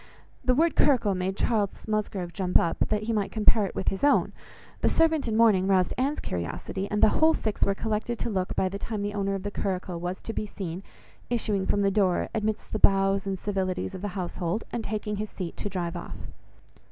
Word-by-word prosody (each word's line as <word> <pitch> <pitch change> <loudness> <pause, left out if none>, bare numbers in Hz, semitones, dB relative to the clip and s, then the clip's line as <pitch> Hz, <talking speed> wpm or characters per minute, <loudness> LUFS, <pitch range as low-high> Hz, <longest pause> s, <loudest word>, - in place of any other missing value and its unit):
The 255 0 +3
word 325 +3 +3
curricle 245 -8 +4
made 185 +2 -2
Charles 215 -4 0
Musgrove 200 -5 -2
jump 185 -3 +3
up 165 - 0
that 215 0 0
he 225 +1 -1
might 205 -3 0
compare 215 -1 +3
it - - -9
with - - 0
his 195 - -5
own; 285 - +4 0.5
the - - +2
servant 320 -4 +2
in 220 -1 0
mourning 210 -5 +5
roused 185 -2 +3
Anne's 275 +4 0
curiosity, 90 - -4
and 210 - 0
the - - +8
whole 320 +6 +4
six 215 -2 -2
were 200 - +2
collected 220 +3 -2
to 235 - -2
look, 185 -2 -1
by 190 - +2
the 200 +2 -5
time 215 -2 -3
the 205 0 -2
owner 195 -1 -1
of 190 - -5
the 205 - -3
curricle 185 -3 -3
was 180 +2 -3
to 225 - -5
be 215 - -3
seen 185 -3 -5 0.5
issuing 210 -5 0
from 205 0 +2
the 195 - +3
door 190 -3 +2
amidst 215 -1 -2
the - - -1
bows 195 0 +3
and 195 -1 -1
civilities 190 -1 -2
of 185 - -6
the 205 - -2
household, 180 +2 -2
and 235 - -3
taking 210 -1 -3
his 215 +1 -3
seat, 180 -3 -6
to 205 - -3
drive 180 -2 -3
off. 175 - -6
200 Hz, 220 wpm, -27 LUFS, 190-220 Hz, 0.5 s, the